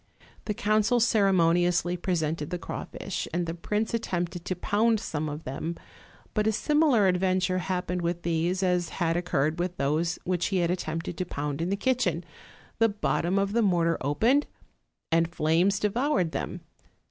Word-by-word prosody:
The 210 - -2
council 215 +4 +2
ceremoniously 180 -5 +3
presented 165 -4 -1
the 180 - -2
crawfish, 185 +2 -5
and 175 +1 -1
the 165 - -3
prince 210 +6 -2
attempted 175 -6 -2
to 185 - -2
pound 220 +5 +2
some 155 -7 -3
of 150 +2 -6
them; 150 +6 -4 0.6
but 215 -1 +1
a - - +4
sim 295 +8 +1
ilar 240 -11 +4
adventure 185 0 +1
happened 180 -1 -2
with 175 0 -2
these 170 +3 0
as 180 -2 +1
had 165 -2 +1
occurred 165 -3 0
with 180 0 -2
those 155 +5 0
which 180 -1 0
he 195 - 0
had 175 -1 +2
attempted 165 -1 -3
to 185 - 0
pound 145 -2 -3
in 170 - -1
the 200 - +1
kitchen: 205 - 0 0.6
the 225 0 +5
bottom 195 -3 0
of 195 0 +1
the 235 - +3
mortar 170 -5 +2
opened, 225 - +2 0.6
and 165 +1 +2
flames 170 +6 +2
devoured 230 - +1
them. - - -4
180 Hz, 165 wpm, -27 LUFS, 165-205 Hz, 0.6 s, the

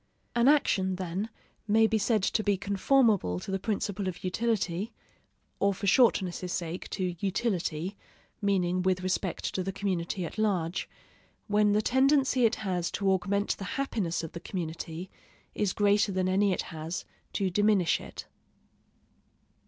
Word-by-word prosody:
An 240 +1 +3
action, 195 -10 +3
then, 185 +4 -3 0.4
may 220 +1 +5
be 220 0 +2
said 215 -1 +1
to 215 - +1
be 205 -2 +2
conformable 200 - +2
to 190 - -6
the 195 - 0
principle 200 -1 -2
of 185 - -5
utility, 200 0 -1 0.7
or 200 0 +2
for 200 - -5
shortness' 190 -5 +3
sake 175 0 -4
to 185 -2 -2
utility 190 -3 -1 0.5
(meaning 185 -3 +1
with 185 0 +1
respect 185 -1 -2
to 190 - -1
the 195 - -2
community 185 -2 -2
at 190 - -7
large), 185 -5 0 0.6
when 210 -1 +3
the 210 +1 +2
tendency 265 0 +3
it 230 - +3
has 180 -5 -2
to 195 -1 0
augment 200 +2 +1
the - - -6
happiness 210 -12 -1
of 165 - -6
the 170 - -7
community 170 0 -5 0.4
is 205 -3 0
greater 205 +1 +3
than 185 -1 0
any 195 +2 +3
it 185 - -1
has 160 +2 -5 0.3
to 190 -2 0
diminish 205 -3 +3
it. - - -8
195 Hz, 150 wpm, -29 LUFS, 180-210 Hz, 0.7 s, may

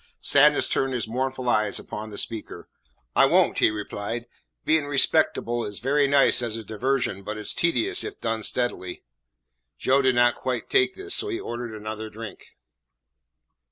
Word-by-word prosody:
Sadness 145 +1 +5
turned 135 -1 0
his 115 -3 -2
mournful 130 +2 -3
eyes 105 -3 +2
upon 110 +1 -7
the 105 - -9
speaker. 110 -2 -3 0.5
"I - - +6
won't," - - +3
he - - +5
replied. 110 +2 -5 0.4
"Being 155 -2 +2
respectable 135 -4 +1
is 105 -1 -6
very 140 +7 +2
nice 140 -2 +4
as 115 -2 -3
a 115 - -7
diversion, 110 -2 -1
but 105 +2 -6
it 105 - -7
's - - -2
tedious 345 - +1
if 410 -1 -7
done 115 0 -2
steadily." 110 -6 -2 0.7
Joe 135 +1 +2
did 130 -2 +2
not 120 0 +4
quite 125 -2 -4
take 385 -1 +3
this, 395 +1 -4
so 420 - 0
he 360 -2 -3
ordered 120 -1 -6
another 110 +1 -6
drink. 110 -2 -11
120 Hz, 165 wpm, -25 LUFS, 110-140 Hz, 0.7 s, I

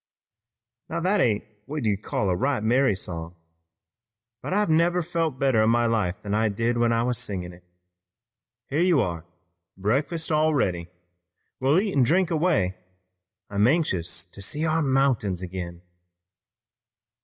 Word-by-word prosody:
"Now - - -2
that 190 +3 +2
ain't 110 -7 +2 0.2
what 145 -3 -4
you'd 100 -2 0
call 100 -2 -1
a - - +1
right 130 +3 0
merry 120 -1 +3
song, 85 -2 -6 1.1
but - - -5
I 210 +2 +2
never 170 +2 +2
felt 165 -4 -2
better 130 -5 +2
in 110 - +3
my 120 +1 +3
life 105 -6 0
than 100 -1 -3
I 110 +1 +2
did 115 +3 -1
when 120 0 +3
I 115 0 +2
was 125 -1 0
singin' 90 -7 -5
it. 90 +1 -17 1.0
Here 145 +4 -1
you 175 -4 +4
are, 85 -7 -2 0.5
breakfast 145 - -1
all 155 0 +3
ready! 90 -9 -1 0.7
We'll 140 +6 +3
eat, 190 -10 +1
drink 175 +7 +2
an' 165 - +1
away. 150 - +1 0.7
I'm 100 +2 +2
anxious 90 - 0
to 95 +3 -13
see 150 +10 -1
our 160 +1 +1
mountains 130 - +1
ag'in." 90 -1 -6
120 Hz, 155 wpm, -25 LUFS, 95-155 Hz, 1.1 s, you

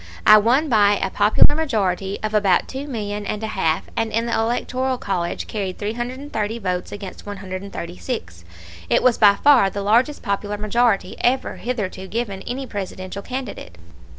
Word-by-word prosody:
I 215 0 +9
won 250 +9 +3
by 210 -5 +4
a 190 - -2
popular 220 +7 +4
majority 200 - -1
of 215 0 -2
about 200 -4 +3
two 270 +2 -6
million 210 -5 -4
and 210 +1 -3
a 220 - -3
half, 160 -4 +1
and 225 -1 -1
in 230 +2 0
the 235 - -2
electoral 250 +3 0
college 180 -6 -2
carried 195 -4 -4
330 235 0 -3
votes 180 -4 -3
against 200 -1 -8
136. 185 - -6 0.5
It - - +3
was 255 -2 +3
by 205 -2 +7
far 255 -5 +5
the 200 +1 -4
largest 240 +8 +2
popular 205 +1 -2
majority 215 -2 +1
ever 260 +2 +1
hitherto 200 -6 -4
given 210 -3 -3
any 265 +2 -3
Presidential 195 -3 -6
candidate. 250 - -6
210 Hz, 155 wpm, -21 LUFS, 195-240 Hz, 0.5 s, I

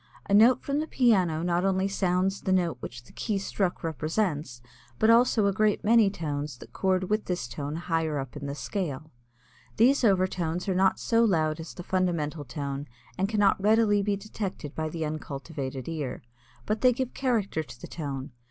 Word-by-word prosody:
A - - 0
note 225 +5 +6
from 280 +1 -1
the 310 - -2
piano 185 - +2
not 175 0 +1
only 190 0 +2
sounds 190 0 0
the 190 - -1
note 175 -6 +2
which 120 0 -8
the - - -18
key 210 -3 -2
struck 195 -2 -2
represents, 155 - -2 0.4
but 220 - +5
also 230 -2 +4
a 200 - +2
great 210 +1 +1
many 225 -1 +5
tones 150 -6 -4
that - - -14
chord 185 -1 +1
with 215 +2 0
this 180 -8 -2
tone 140 +5 -5
higher 165 -2 -1
up 135 -3 -4
the 140 -1 -5
scale. 155 -4 -4 0.7
These 260 +5 +4
overtones 185 -4 +1
are 190 - +1
not 190 +1 +3
so 230 0 +2
loud 160 -7 +2
as 165 - -8
the 175 - -7
fundamental 170 -5 -1
tone 140 +1 -4 0.3
and 195 +2 0
cannot 205 -3 +3
readily 210 0 +4
be 200 0 0
detected 195 -7 -6
by 155 0 -2
the 160 0 -3
uncultivated 140 -3 -5
ear. 150 -6 -4 0.4
But 215 +1 -1
they 255 -1 +5
give 255 0 -3
character 225 -11 0
to 155 - -11
the - - -8
tone. 140 -4 -5
180 Hz, 180 wpm, -27 LUFS, 155-205 Hz, 0.7 s, note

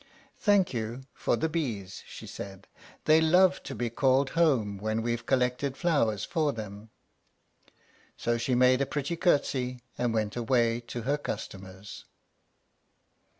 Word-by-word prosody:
"Thank 205 -6 +3
you 115 +2 -4
for - - 0
the 160 - 0
bees," 115 - -3
she - - -9
said. 95 -1 -8 0.4
"They 155 +1 +6
love 180 +3 +4
to 135 - -7
be 120 -2 -2
called 135 +2 +2
home 130 -12 +2
when 110 +2 -1
we've 120 0 -2
collected 130 +1 +1
flowers 115 - +1
for 155 -4 +1
them." 105 -2 -8 1.3
So 120 0 0
she 125 +2 0
made 130 +1 +5
a 140 - +1
pretty 145 +2 -2
little 175 +1 +3
courtesy, 125 -3 -2 0.2
and 120 -1 +1
went 110 -2 -1
away 120 -1 +2
to 120 - -5
her 145 +4 0
customers. 95 -5 -7
125 Hz, 145 wpm, -29 LUFS, 110-145 Hz, 1.3 s, They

